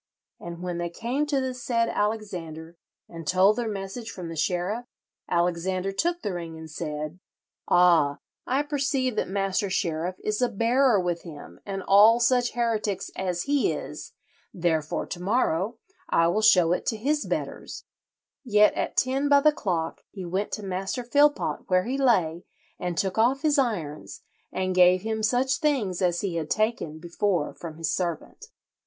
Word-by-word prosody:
And 170 0 -8
when 175 -1 -3
they 175 0 -2
came 245 - -2
to 285 -2 +1
the 260 -1 -2
said 240 -2 0
Alexander 175 -8 -3 0.3
and 165 -2 -10
told 190 +5 +4
their 240 -2 -2
message 205 +3 -5
from 180 -5 -7
the 165 - -6
sheriff, 180 +8 -1 0.4
Alexander 180 +2 0
took 345 - -1
the 200 - -2
ring, 165 -2 -6
and 160 0 -9
said, 150 +2 -5 0.5
'Ah, 170 -5 +4 0.3
I 270 +3 +1
perceive 275 -4 -1
that - - 0
Master 195 0 0
Sheriff 175 -1 -1
is 215 +2 -1
a 245 - +3
bearer 235 +1 +3
with 175 -2 -1
him 155 -4 -11
and 195 -1 -4
all 215 +4 +6
such 245 0 +2
heretics 220 -5 -1
as 180 -2 -2
he 285 -1 +1
is, - - -7 0.4
therefore 160 -4 -1
to 175 - -7
morrow 205 0 0 0.3
I 165 0 +3
will 210 +5 +1
show 180 -6 +5
it 180 - -1
to 220 - 0
his 290 +7 -1
betters;' - - -4 0.6
yet 210 -4 +4
at - - -3
ten 270 +3 +1
by 285 -1 +6
the 305 +1 +5
clock 170 - -3
he 190 -3 -8
went 190 +4 -2
to 210 - -4
Master 195 +6 -3
Philpot 290 +4 +2
where 185 0 +3
he 260 +6 -2
lay 180 -10 +2 0.4
and 180 -2 -3
took 190 +2 0
off 260 +5 +2
his 300 -2 +3
irons, 175 - -3 0.3
and 185 0 -1
gave 180 0 +5
him 220 0 -2
such 250 +4 +2
things 255 - 0
as 175 -2 +1
he 185 -4 -2
had 155 -2 -3
taken 215 -8 -1
before 175 0 -1
from 160 -2 -9
his 165 -2 -1
servant." 175 -4 -4
195 Hz, 170 wpm, -26 LUFS, 175-240 Hz, 0.6 s, all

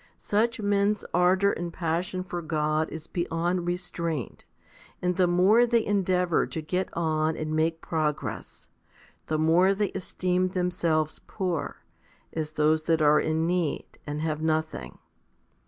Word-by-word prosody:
Such 230 +3 0
men's 205 0 +1
ardour 185 +3 +4
and 175 0 -4
passion 175 +2 -2
for 175 -1 -5
God 155 -1 0
is 160 -1 -7
beyond 175 +1 -1
restraint, 170 - -3 0.5
and 180 0 0
the 180 0 +3
more 195 +7 +5
they 235 -1 +2
endeavour 185 -4 +1
to - - -5
get 180 +4 -1
on 160 -1 0
and 155 0 -2
make 160 +1 +1
progress, 155 -3 -3 0.6
the 155 - 0
more 170 +5 +4
they 205 -1 0
esteem 185 0 0
themselves 175 -4 0
poor, 180 -6 -3 0.5
as 155 -1 -3
those 155 +1 +2
that 160 -2 +2
are 150 0 +6
in 160 +1 0
need 175 -3 -2
and 150 +1 -3
have 155 -1 -2
nothing. 155 - -2
170 Hz, 140 wpm, -27 LUFS, 155-185 Hz, 0.6 s, are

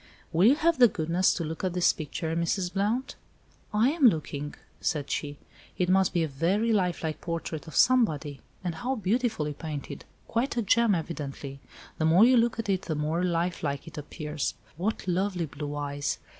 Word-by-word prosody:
"Will 175 +6 +5
you 265 - +6
have 320 -1 +2
the 245 - +9
goodness 170 0 +1
to 170 - -2
look 160 +3 -5
at 185 -2 0
this 180 -1 +3
picture, 160 +1 -4
Mrs. 175 +2 -1
Blount?" 210 +6 0 0.6
"I 220 +6 +3
am 305 -5 +5
looking," 150 -6 -1 0.2
said 150 -4 -1
she. 145 -1 -3 0.4
"It 180 -1 +1
must 190 0 +4
be 170 -2 +1
a - - 0
very 185 +11 +1
life 180 -5 0
like 160 -1 -3
portrait 165 -2 -4
of 160 - -9
somebody. 155 - +3 0.2
And 175 -2 -2
how 250 +11 -2
beautifully 215 - 0
painted! 150 -1 -6 0.2
Quite 240 +2 -1
a 235 - +2
gem, 230 0 +4
evidently. 145 -4 -5 0.4
The 160 - +2
more 170 +7 +6
you 255 +1 +6
look 235 -1 +3
at 225 - -3
it 190 -2 +1
the 160 - -3
more 155 +4 -1
life 175 0 0
like 140 -1 -2
it 165 - -10
appears. 150 -1 -4 0.2
What 190 +4 -2
lovely 185 -1 0
blue 145 0 -6
eyes! 145 0 -2
170 Hz, 185 wpm, -28 LUFS, 155-210 Hz, 0.6 s, the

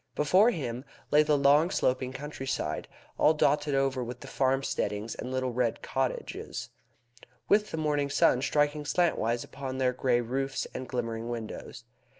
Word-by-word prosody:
Before 185 +10 +5
him 125 - -3 0.3
lay 150 - +6
the 150 -1 +3
long 145 +4 +5
sloping 130 -6 0
countryside, 135 0 -4 0.3
all 155 - +5
dotted 145 -1 +2
over 135 -2 +1
with 125 +1 -7
the 140 - -9
farmsteadings 130 -5 -1
and - - -6
little 130 -1 -1
red 120 -2 0
cottages, 130 -1 -3 0.8
with 210 +1 +3
the - - -4
morning 145 -2 0
sun 140 -3 +3
striking 145 +1 +1
slantwise 140 -8 +1
upon 135 -1 -6
their 130 -1 +2
grey 125 -1 +2
roofs 135 +3 -2
and 130 0 -6
glimmering 115 -2 -3
windows. 115 0 -6
135 Hz, 150 wpm, -29 LUFS, 125-145 Hz, 0.8 s, lay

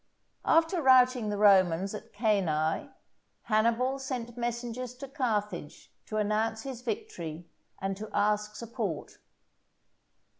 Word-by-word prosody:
After 330 +2 +3
routing 255 -4 +5
the 205 - -2
Romans 195 -2 +4
at 210 - -8
Cannæ, 200 - 0 0.5
Hannibal 235 +4 +2
sent 245 -3 -4
messengers 240 +1 -4
to 275 +2 -8
Carthage 210 - -3
to 215 - -3
announce 220 +1 0
his 260 -3 -6
victory, 175 -8 -5 0.3
and 195 0 -2
to 215 +1 -7
ask 210 0 +1
support. 225 - -5
220 Hz, 110 wpm, -29 LUFS, 205-250 Hz, 0.5 s, routing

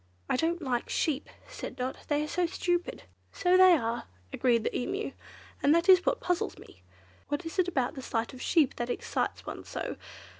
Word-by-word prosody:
"I - - +1
don't 330 +5 0
like 245 -3 -1
sheep!" 300 -2 0 0.2
said - - -7
Dot, 255 +1 -3
"they 295 0 +1
are - - -3
so 350 +3 0
stupid." 350 0 -1 0.3
"So 360 +1 +2
they 370 -1 +8
are," 230 -2 -2 0.3
agreed 235 -3 +2
the - - -2
Emu, 390 - -2 0.5
"and 290 +3 +5
that 335 +1 +2
is 370 -2 +8
what - - +2
puzzles 360 -1 -1
me. 90 - -15 0.5
What 290 +4 -2
is 325 +4 -5
it 365 - +4
about 265 -8 0
the 265 - -7
sight 230 0 -2
of 255 - -10
sheep 310 -6 +2
that 240 0 -2
excites - - -2
one - - -6
so? - - -5
305 Hz, 195 wpm, -29 LUFS, 250-355 Hz, 0.5 s, they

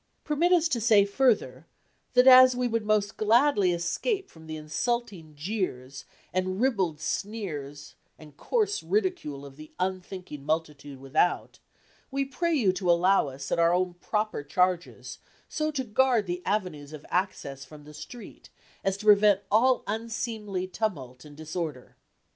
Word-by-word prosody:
Permit 320 +4 +1
us 340 -2 +4
to 240 -7 -1
say 215 -3 +5
further, 200 - 0 0.5
that 250 0 +6
as 255 -1 +8
we 250 0 0
would 230 -1 -1
most 210 -1 0
gladly 220 -3 +3
escape 175 - -2
from 160 -1 -15
the 155 - -5
insulting 170 0 -3
jeers, 145 - -4 0.3
and 185 +1 -1
ribald 195 - 0
sneers 155 -7 -5 0.2
and 150 -2 -15
coarse 430 - -1
ridicule 365 - -2
of 135 0 -13
the 155 0 -12
unthinking 185 -5 -4
multitude 150 -3 -3
without, 140 +6 0 0.5
we 275 0 -1
pray 335 +6 -2
you 205 -10 +2
to 185 -1 -2
allow 175 0 +4
us, 135 0 -8
at - - +1
our 170 +1 +4
own 180 0 0
proper 210 +2 -2
charges, 180 +3 -1 0.3
so 310 0 -2
to 290 -4 -2
guard 240 -1 +2
the 175 0 -4
avenues 170 -8 -2
of 150 -1 -10
access 175 -7 -2
from 150 +2 -14
the 150 +1 -13
street, 155 +11 -11 0.3
as 195 0 0
to 210 - -10
prevent 205 -1 +5
all 250 +5 +3
unseemly 220 -3 -4
tumult 150 - -4
and 145 -1 -14
disorder. 155 -4 -6
185 Hz, 150 wpm, -27 LUFS, 155-230 Hz, 0.5 s, as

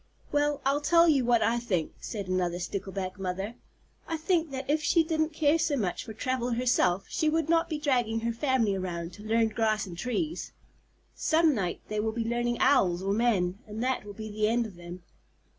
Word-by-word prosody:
"Well, 290 -1 +1
I'll 280 +2 +2
tell 335 +3 +5
you 280 -6 +3
what 235 -2 +3
I 230 +3 +2
think," 185 -9 -2
said 205 -4 -5
another 180 -1 0
Stickleback 190 +1 -4
Mother. 190 +3 -3 0.5
"I 325 - -2
think 330 0 +1
that 265 -1 -5
if 305 +2 +1
she 330 +2 +3
didn't 315 -1 0
care 305 +1 +2
so 295 -3 +1
much 190 -7 -2
for - - -7
travel 250 +1 -1
herself, 215 -7 +2
she 310 - 0
would 320 0 0
not 335 0 +3
be 310 - -2
dragging 245 -6 0
her 230 0 -1
family 240 -4 +1
around 175 -2 -4
to 205 - -12
learn 225 +1 +2
grass 215 -1 0
and 180 -3 -8
trees. 250 - -3 0.6
Some 320 -1 +3
night 185 -7 -2
they 215 0 -2
will 220 +1 -1
be 230 0 -2
learning 240 0 0
Owls 185 -10 +3
or 195 +1 0
men, 200 -5 +1
and 215 +2 -4
that 260 0 0
will 205 -1 -9
be 215 0 -7
the 215 0 +1
end 235 +1 +1
of 205 -5 -9
them!" 175 +1 -10
230 Hz, 205 wpm, -28 LUFS, 195-290 Hz, 0.6 s, tell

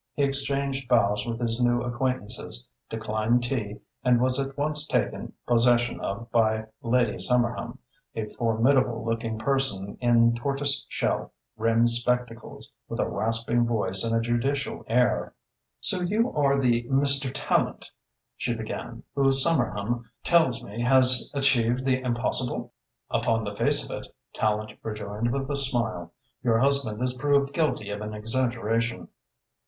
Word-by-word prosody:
He 145 - +1
exchanged 140 -1 -1
bows 105 -3 +2
with 115 -1 -3
his 115 -1 -2
new 120 0 +2
acquaintances, 120 - -2 0.2
declined 110 +2 0
tea 110 -5 -3 0.2
and 125 -1 +4
was 130 +2 +2
at 135 0 -4
once 150 +1 0
taken - - -2
possession 120 0 +2
of 115 +4 -5
by 110 -2 +2 0.2
Lady 120 -2 +1
Somerham, 120 0 -1 0.4
a 110 - -2
formidable 115 +2 +1
looking 115 -1 -2
person 110 -5 -1
in 115 -1 +4
tortoise 140 +3 0
shell - - -2 0.2
rimmed 115 +1 +2
spectacles, 120 -1 -1 0.2
with - - -5
a - - +1
rasping 115 +2 0
voice 95 -5 +1
and 115 0 0
a - - +3
judicial 130 +4 -2
air. 125 +2 +1 0.5
"So 185 - +5
you 215 +7 0
are 140 -2 +2
the 120 -3 +1
Mr. 140 0 +2
Tallente," - - -1 0.4
she 120 - -2
began, 115 +1 -7
"who 135 -1 +3
Somerham 120 -6 0
tells 160 -9 +3
me 105 +4 -7
has 130 0 +6
achieved 130 -2 +2
the 130 -1 +1
impossible!" 125 0 -1 0.4
"Upon 115 -1 +1
the 105 -1 -5
face - - +2
of - - -10
it," - - -8 0.3
Tallente 110 0 -2
rejoined, 105 +1 -3
with 135 +1 -2
a - - 0
smile, 115 -10 -1 0.3
"your 115 -2 +2
husband 130 -3 +1
is 125 0 +1
proved 140 +1 +1
guilty 135 -11 -1
of 105 0 -5
an 105 0 -5
exaggeration." 115 0 -1
120 Hz, 140 wpm, -26 LUFS, 115-135 Hz, 0.5 s, has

